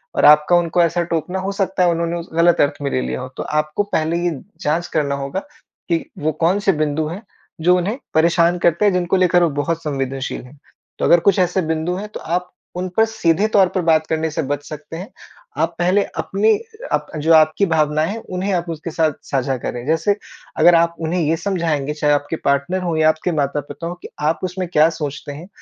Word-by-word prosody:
और - - +3
आपका 150 +3 +6
उनको 175 0 +1
ऐसा 170 +1 +1
टोकना 180 +3 -1
हो 190 +1 -2
सकता 195 -2 0
है 175 - +4
उन्होंने 170 0 -1
उसे 165 -1 -9
ग़लत 170 0 +4
अर्थ 145 0 +2
में 140 - -1
ले 65 - 0
लिया 65 +1 -3
हो। - - -5
तो - - -3 0.2
आपको 155 +7 -1
पहले 160 +2 0
ये 175 - +1 0.3
जाँच 160 +4 0
करना 145 -3 +1
होगा 140 +6 -3 0.5
कि 170 -1 0
वो 155 +1 0
कौन 185 +5 +3
से 195 - +7
बिंदु 155 +1 0
हैं 180 +6 -6 0.5
जो 180 - +7
उन्हें 200 +8 -1 0.2
परेशान 170 +2 +3
करते 170 +5 +2
हैं 200 - +4
जिनको 180 +1 +1
लेकर 180 -1 +4
वो 170 - +3
बहुत 165 +2 -2
संवेदनशील 135 -2 -3
हैं। 140 +3 -16 0.4
तो - - +1
अगर 170 - +6
कुछ 195 -1 +5
ऐसे 180 +1 +2
बिंदु 160 +3 -1
हैं 205 +3 -5
तो - - -5
आप 180 +2 -3 0.2
उन 180 +1 -3
पर 220 - +6
सीधे 210 -3 +1
तौर 195 -2 +6
पर 185 - +2
बात 160 0 +3
करने 160 0 -1
से 160 - -2
बच 145 0 -2
सकते 155 +1 -8
हैं। 185 +4 -7 0.5
आप 165 +1 0
पहले 185 +3 +3
अपनी 210 +3 +2 0.4
अप - - 0
जो 165 +2 +4
आपकी 155 +5 +4
भावनाएँ 155 -1 +1
हैं 225 +2 -4 0.2
उन्हें 190 +2 -1
आप 175 -1 -1
उसके 165 +1 -5
साथ 155 -1 +1 0.2
साझा 135 -1 0
करें। 120 +1 -5
जैसे 165 +6 +2 0.4
अगर 175 - +6
आप 170 0 +2
उन्हें 165 +2 -1
ये 160 +1 +1
समझाएँगे 165 -6 -1
चाहे 150 -1 +1
आपके 145 +3 -1
पार्टनर 140 +7 +1
हो 170 -2 -1
या 155 0 +5
आपके 155 +3 -1
माता-पिता 145 +3 -3
हो 175 - -5
कि - - -9 0.2
आप 165 - -1
उसमें 185 0 -3
क्या 155 -1 +4
सोचते 145 -1 -5
हैं 165 +6 -10
165 Hz, 220 wpm, -19 LUFS, 150-180 Hz, 0.5 s, से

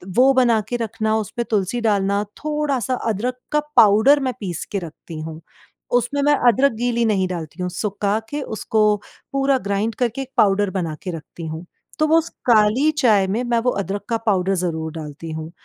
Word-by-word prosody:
वो 260 +2 +6
बनाके 240 -3 +2
रखना 220 -1 -1
उस 215 -3 -3
पे 235 - +1
तुलसी 215 +1 -1
डालना 200 -2 +1
थोड़ा 300 -3 -1
सा 245 +3 -2 0.2
अदरक 245 +5 -2
का 300 - +3 0.2
पाउडर 220 +8 +6
मैं 260 -2 -1
पीस 180 -6 -4
के 200 - -1
रखती 165 -1 -9
हूँ, 160 0 -7 0.5
उसमें 245 +4 +1
मैं 295 +1 +4 0.2
अदरक 270 +5 +3
गीली 235 0 0
नहीं 195 -4 +1
डालती 175 -1 -6
हूँ 180 - -1
सुखा 200 +2 -1
के 295 0 -3
उसको 220 -3 0 0.5
पूरा 275 0 +2
ग्राइंड 200 +2 -1
करके 245 +2 -1
एक 265 - -7
पाउडर 200 0 +3
बनाके 165 +1 -4
रखती 165 +2 -10
हूँ। 160 +2 -6 0.3
तो 310 - +3
वो 320 +1 +5
उस 330 0 0 0.2
काली 225 +6 +4
चाय 210 -8 +4
में 220 +6 -1
मैं 240 -1 +1
वो 250 +1 +1
अदरक 200 +1 -3
का 230 - +1
पाउडर 195 -1 +2
ज़रूर 160 -3 -2
डालती 160 0 -7
हूँ। 160 +1 -6
215 Hz, 190 wpm, -21 LUFS, 185-250 Hz, 0.5 s, वो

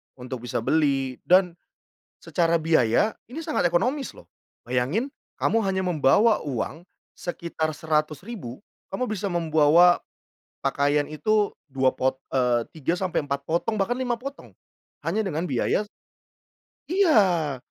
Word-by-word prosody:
untuk 125 0 -7
bisa 115 - -2
beli 135 -3 +1
dan 180 0 +5 0.7
secara 170 -2 +1
biaya 160 - +2 0.2
ini 260 - -9
sangat 240 - +1
ekonomis 250 - -1
loh. - - -14 0.4
Bayangin 135 - -1 0.2
kamu 225 0 +2
hanya 190 -2 -1
membawa 180 +7 +3
uang 140 +3 -4 0.3
sekitar 170 -2 -3
Rp100.000 155 - -3 0.3
kamu 225 +7 -2
bisa 210 -4 -3
membawa 165 0 +4 0.6
pakaian 145 +1 +1
itu 205 +7 0 0.2
2 130 -1 +1
pot 130 0 0 0.2
eee, 120 -3 +2
3 165 +3 -1
sampai 185 -5 -1
4 140 0 -4
potong 195 +7 -1
bahkan 200 +5 +1
5 245 -2 -2
potong 275 +3 -8 0.6
hanya 220 - +1
dengan 175 -3 -2
biaya 210 - 0 1.0
Iya, 195 - +3
170 Hz, 120 wpm, -25 LUFS, 140-210 Hz, 1.0 s, dan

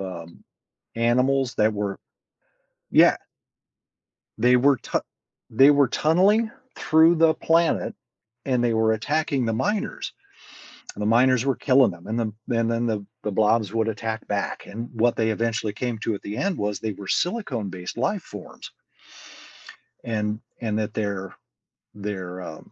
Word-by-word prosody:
um, 85 -3 -8 0.5
animals 125 +3 +1
that 105 0 +2
were 100 -1 -3 0.9
Yeah. - - +6 1.2
They 125 +3 +4
were, 135 +2 +4
tu - - -2 0.5
they 135 +6 +6
were 140 -2 +4
tunneling 195 - +2 0.2
through 160 +3 +4
the 160 -1 +4
planet 165 +1 +1 0.5
and 125 -3 +1
they 120 -1 +2
were 110 0 +3
attacking 140 +3 -1
the 115 - 0
miners. 205 - -2 0.8
And 105 - -6
the - - 0
miners 125 +2 +4
were 135 - +1
killing 130 -4 +4
them 85 -1 -12
and 110 +2 -2
then 110 -3 -2
then 115 -2 0
then 115 +1 0
the 105 -3 -2 0.2
the 105 - -3
blobs 105 0 +2
would 115 0 0
attack 110 0 -4
back 100 -1 -3
and 115 +3 -7
what 120 +1 +1
they 110 -1 +1
eventually 115 -1 -1
came 120 +2 -3
to 115 - -1
at 100 - -6
the 105 +1 -6
end 195 - -1
was 105 -1 -2
they 110 -1 -2
were 100 0 -10
silicone-based 115 - -2
life 140 - -1
forms 105 -2 -11 1.3
and 105 -2 -2 0.2
and 110 -2 -1
that 110 0 -3
they're 100 -3 -3 0.6
they're 95 -3 -6
um 80 -3 -10
115 Hz, 150 wpm, -24 LUFS, 105-130 Hz, 1.3 s, Yeah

